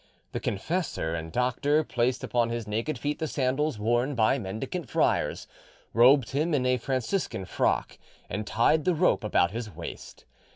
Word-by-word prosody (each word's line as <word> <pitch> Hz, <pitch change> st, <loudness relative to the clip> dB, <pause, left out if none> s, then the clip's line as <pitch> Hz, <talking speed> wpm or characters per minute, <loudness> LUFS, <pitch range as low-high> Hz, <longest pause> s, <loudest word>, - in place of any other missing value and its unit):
The -, -, -3 dB
confessor 145 Hz, -, -2 dB
and 80 Hz, -1 st, -4 dB
doctor 130 Hz, -, +1 dB
placed 125 Hz, -2 st, 0 dB
upon 120 Hz, -1 st, +1 dB
his 115 Hz, -2 st, -4 dB
naked 115 Hz, +7 st, -2 dB
feet 145 Hz, +4 st, -3 dB
the 160 Hz, -, -1 dB
sandals 135 Hz, 0 st, 0 dB
worn 120 Hz, +6 st, +1 dB
by 115 Hz, +4 st, +3 dB
mendicant 120 Hz, -, -5 dB
friars, -, -, +1 dB, 0.5 s
robed 130 Hz, +2 st, +5 dB
him 150 Hz, +4 st, +1 dB
in 130 Hz, -3 st, 0 dB
a 125 Hz, 0 st, +3 dB
Franciscan 130 Hz, -, -2 dB
frock, -, -, 0 dB, 0.3 s
and 105 Hz, +3 st, -4 dB
tied 150 Hz, +7 st, +2 dB
the 180 Hz, -, +3 dB
rope 165 Hz, -6 st, +2 dB
about 90 Hz, -4 st, +2 dB
his 115 Hz, 0 st, -5 dB
waist. 85 Hz, -3 st, -9 dB
125 Hz, 160 wpm, -27 LUFS, 110-145 Hz, 0.5 s, robed